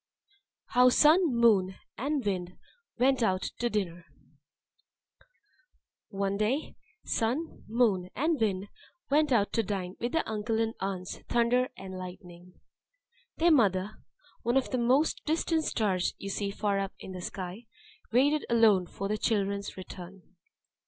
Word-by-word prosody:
How 250 +1 +6
Sun, 310 +5 +5
Moon, 205 -6 +4 0.2
and 280 0 -2
Wind 185 -3 -2 0.4
went 260 +1 +3
out 190 -4 +1 0.2
to 240 - +1
Dinner 175 -6 -3 2.0
One 195 0 -1
day 240 +9 -1 0.3
Sun, 250 +9 -2
Moon, 215 -6 +1
and 310 -1 0
Wind 200 -2 0 0.4
went 300 0 +3
out 205 -5 +2
to 230 - +2
dine 190 -3 -4
with 240 +1 -3
their 325 - 0
uncle 220 +1 -1
and 225 0 0
aunts 190 -2 -4
Thunder 240 +2 +2
and 190 -1 -7
Lightning. 180 -1 -11 0.8
Their 340 +1 +4
mother 200 - +3 0.5
(one 240 +3 +1
of 270 - 0
the 255 - 0
most 260 +6 +2
distant 320 0 0
Stars 190 -5 0
you 195 - -6
see 200 0 -2
far 200 0 -1
up 195 -1 -3
in - - -9
the 185 -1 -6
sky) 185 +5 -6 0.4
waited 285 +6 +3
alone 220 -6 +4
for 195 - -5
her 215 +1 -1
children's 200 -3 -1
return. 185 0 -10
215 Hz, 140 wpm, -29 LUFS, 190-250 Hz, 2.0 s, How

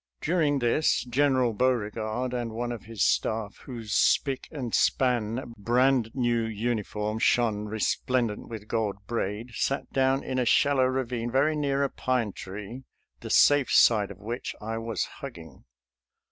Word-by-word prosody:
During 155 -4 +1
this 125 +5 +2
General 130 -1 +2
Beauregard, 115 0 -1
and 120 -2 -3
one 120 +1 -3
of 115 -4 -7
his 110 -3 -2
staff 110 -2 0
whose 115 -5 -6
spick 135 -3 +2
and 130 -7 -5
span, 120 -1 +1
brand 125 +2 +2
new 120 -3 +1
uniform 110 -1 -2
shone 110 -3 +2
resplendent 110 +1 -1
with 110 -2 -8
gold 105 -3 -2
braid, 115 +1 -3
sat 135 +3 -2
down 135 0 +2
in 130 -1 -2
a 125 - +1
shallow 140 +2 +3
ravine 125 -2 -2
very 140 +5 +2
near 140 -2 0
a 140 - 0
pine 125 -5 -1
tree, 105 +6 -8 0.4
the - - -8
safe 145 -3 +5
side 105 -4 +5
of 100 - -9
which 115 +5 -5
I 115 +1 -4
was 115 -4 -2
hugging. 80 -3 -10
120 Hz, 145 wpm, -27 LUFS, 110-130 Hz, 0.4 s, safe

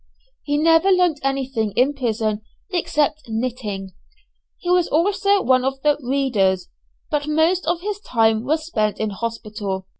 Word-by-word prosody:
He 290 0 -1
never 325 +4 +4
learnt 360 -5 +3
anything 265 -6 -1
in 265 +4 +3
prison 220 -5 -1 0.3
except 305 -4 0
knitting. 220 -5 -3 0.7
He 355 - -3
was 360 -1 +3
also 395 +4 +2
one 255 -1 +3
of 270 +1 -1
the 295 -1 +3
"readers," 225 -9 +1 0.4
but 295 -1 -1
most 320 +4 +2
of 345 0 0
his 410 +1 -3
time 225 - +1
was 310 +4 -1
spent 215 -10 -1
in 220 -1 -1
hospital. 210 -3 -4
270 Hz, 145 wpm, -21 LUFS, 220-325 Hz, 0.7 s, never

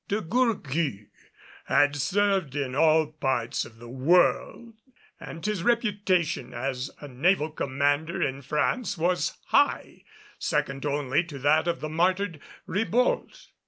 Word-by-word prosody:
De 205 - 0
Gourgues 165 - -1 0.6
had 145 0 +3
served 190 -1 0
in 135 -3 -2
all 155 +2 +4
parts 135 -6 -2
of 110 -1 -14
the 120 +1 -12
world 175 - +1 0.5
and 165 - -8
his 210 -4 -1
reputation 190 - 0
as 130 +1 -3
a 145 - -7
naval 155 +4 +1
commander 145 +3 -1
in 135 +1 -1
France 165 - -1
was 175 +2 0
high - - +1 0.4
second 135 +1 -1
only 145 +1 +1
to 165 -5 -9
that 150 +5 +2
of 170 - -1
the 155 - -4
martyred 180 +1 0 0.3
Ribault. 225 +7 -1
155 Hz, 125 wpm, -26 LUFS, 135-185 Hz, 0.6 s, all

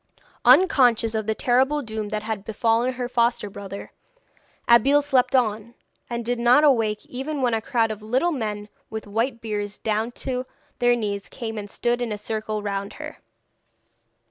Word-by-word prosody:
Unconscious 250 -6 +5
of 220 -1 -2
the 220 - 0
terrible 265 +4 +2
doom 220 -2 -4
that 215 0 -3
had 215 -3 -4
befallen 225 +3 +1
her 250 -1 -3
foster 235 -4 0
brother, 200 0 -8 0.8
Abeille 275 +5 +5
slept 265 -2 +2
on, 225 -2 0 0.3
and 235 -1 -3
did 245 0 -1
not 245 +5 +5
awake 225 -7 +2
even 270 +2 -4
when 245 -2 +2
a 225 - 0
crowd 225 -1 +1
of 215 -1 -6
little 255 +11 +1
men 210 -7 -3 0.2
with 220 0 -6
white 230 +3 -2
beards 205 -2 -4
down 220 +2 -1
to 255 0 -4 0.3
their 245 0 +4
knees 205 -4 -3
came 225 -3 -6
and 205 -1 -6
stood 240 +3 -1
in 240 -2 -2
a 210 - -2
circle 215 0 -4
round 200 -1 -3
her. - - -9
230 Hz, 170 wpm, -24 LUFS, 215-250 Hz, 0.8 s, Unconscious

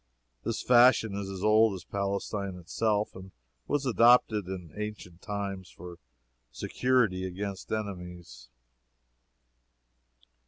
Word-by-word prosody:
This - - -3
fashion 120 -3 +5
is 100 -1 -4
as 95 0 -6
old 110 -1 +4
as 90 - -9
Palestine 100 0 -3
itself 105 +5 -1
and 95 0 -10 0.4
was 145 -1 0
adopted 115 -5 +4
in 90 -3 -7
ancient 105 -5 -7
times 100 -3 -5
for 90 0 -11 0.5
security 115 - +1
against 95 +1 -5
enemies. 90 - -6
100 Hz, 105 wpm, -29 LUFS, 90-110 Hz, 0.5 s, fashion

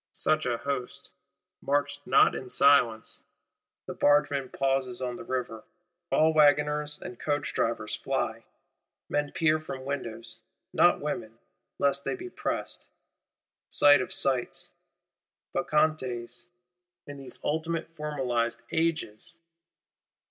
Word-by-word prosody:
Such 155 -3 +1
a 120 -1 0
host—marched 140 +2 -4
not - - +5
in 130 - -6
silence! 125 -5 +3 0.6
The - - -5
bargeman 145 -2 +2
pauses 135 -2 -1
on 125 -1 -3
the - - -8
River; 120 -3 -4 0.5
all 160 +1 +4
wagoners 150 0 +3
and 120 - -9
coachdrivers 145 -1 -1
fly; - - -1 0.7
men 145 0 0
peer 155 -1 +2
from 135 -4 -7
windows,—not 120 -5 -1
women, - - -4 0.4
lest 140 0 +1
they - - -2
be 365 0 -8
pressed. - - -4 0.8
Sight 145 -2 +6
of - - -5
sights: 130 -3 -1 0.8
Bacchantes, 130 -7 -1 0.6
in 145 0 -9
these 135 -2 -8
ultimate 160 +2 -1
Formalized 125 -6 -1
Ages! 165 -2 -1
140 Hz, 105 wpm, -28 LUFS, 125-150 Hz, 0.8 s, Sight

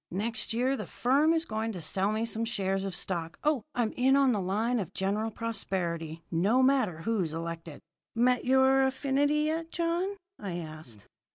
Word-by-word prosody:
Next 220 +4 -1
year 250 +4 +1
the - - -6
firm 280 +6 +2
is 330 0 +1
going 220 -1 -3
to 180 - -6
sell 190 +5 +1
me 220 +1 0
some 230 0 -1
shares 195 -4 -1
of 195 - -4
stock. 165 -3 -3
Oh, 300 -4 +2
I'm 240 -4 +1
in 265 +2 +3
on 275 -2 +4
the 210 -4 0
line 220 +6 0
of 190 -2 -5
General 205 +3 0
Prosperity, 175 -8 -3
no 205 +10 +3
matter 225 -12 +2
who's 195 -9 0
elected!" 165 -1 -6 0.3
"Met 250 +2 +3
your 265 +1 +4
affinity 280 +2 +1
yet, 320 +2 -1
John?" 345 +4 -1 0.2
I 185 -4 -4
asked. 155 - -9
225 Hz, 175 wpm, -29 LUFS, 185-265 Hz, 0.3 s, on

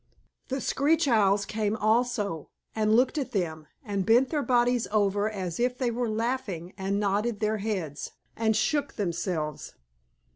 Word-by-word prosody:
The 265 0 -2
Screech 300 +5 +2
Owls 200 -4 +3
came 215 0 -1
also, 215 - 0 0.2
and 215 0 +2
looked 260 +5 +3
at 275 - -4
them, 160 -6 -2 0.2
and 200 -3 -1
bent 240 +6 +4
their 300 -2 +1
bodies 245 -2 +2
over 205 0 +2
as 185 -4 -4
if 250 +1 +1
they 250 -3 0
were 240 0 -1
laughing, 215 -6 -2
and 195 +1 -1
nodded 210 +2 0
their 215 0 0
heads, 185 -9 -3 0.2
and 220 -1 +1
shook 280 +6 0
themselves. 170 -5 -3
215 Hz, 150 wpm, -27 LUFS, 195-245 Hz, 0.2 s, bent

